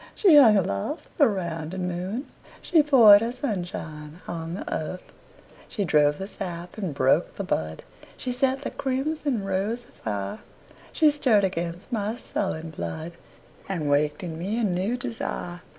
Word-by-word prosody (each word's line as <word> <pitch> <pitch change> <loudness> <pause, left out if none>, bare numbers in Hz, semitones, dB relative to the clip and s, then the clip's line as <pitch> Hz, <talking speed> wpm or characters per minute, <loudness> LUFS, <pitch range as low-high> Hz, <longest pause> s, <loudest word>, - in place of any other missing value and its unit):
She 375 -7 +6
hung 230 -8 +8
aloft 100 - -2
the 285 - +7
rounding 180 -2 -3
moon, 185 +9 -3 0.3
She 330 -4 +4
poured 235 -9 +8
her 230 +1 -1
sunshine 175 - -5
on 165 0 -4
the - - -5
earth, 180 +4 -5 0.6
She 200 - -2
drove 150 -2 +3
the 190 - -4
sap 175 -4 -6
and 195 -6 -3
broke 140 +4 +2
the 200 - -4
bud, 80 - -3 0.3
She 250 - -3
set 265 +2 0
the - - -3
crimson 270 -3 -1
rose 200 +5 -2
afire. 100 -2 -5 0.5
She 310 -2 +4
stirred 250 -8 +3
again 175 -2 -2
my 215 -1 -1
sullen 165 -8 -3
blood, 155 - -5 0.6
And 160 -7 -1
waked 150 +3 +1
in 165 -2 -5
me 205 +7 -2
a - - 0
new 195 +4 0
desire. 225 -7 -4
190 Hz, 150 wpm, -25 LUFS, 165-235 Hz, 0.6 s, hung